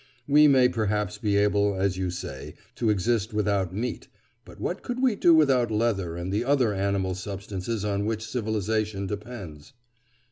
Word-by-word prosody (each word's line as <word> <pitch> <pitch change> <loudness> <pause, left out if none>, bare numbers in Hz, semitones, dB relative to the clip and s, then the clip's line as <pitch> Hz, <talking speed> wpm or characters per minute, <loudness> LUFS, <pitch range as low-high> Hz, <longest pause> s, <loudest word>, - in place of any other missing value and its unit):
We 150 +1 +6
may 130 -3 +5
perhaps 105 -3 -1
be 105 -2 0
able, 100 0 +2
as 95 0 0
you 95 -1 -2
say, 90 +1 -7 0.2
to 115 - -1
exist 110 +2 0
without 100 -4 0
meat, 115 +6 -4 0.4
but - - -14
what - - -3
could 245 0 -4
we 255 -4 +2
do 175 - +4
without 135 -6 +3
leather 105 -6 0
and 90 +2 -4
the 105 - +1
other 130 -5 +2
animal 95 -1 -1
substances 100 +2 -5
on 100 0 -1
which 110 0 -2
civilisation 110 -3 -2
depends? 100 -7 -8
105 Hz, 165 wpm, -26 LUFS, 95-115 Hz, 0.4 s, We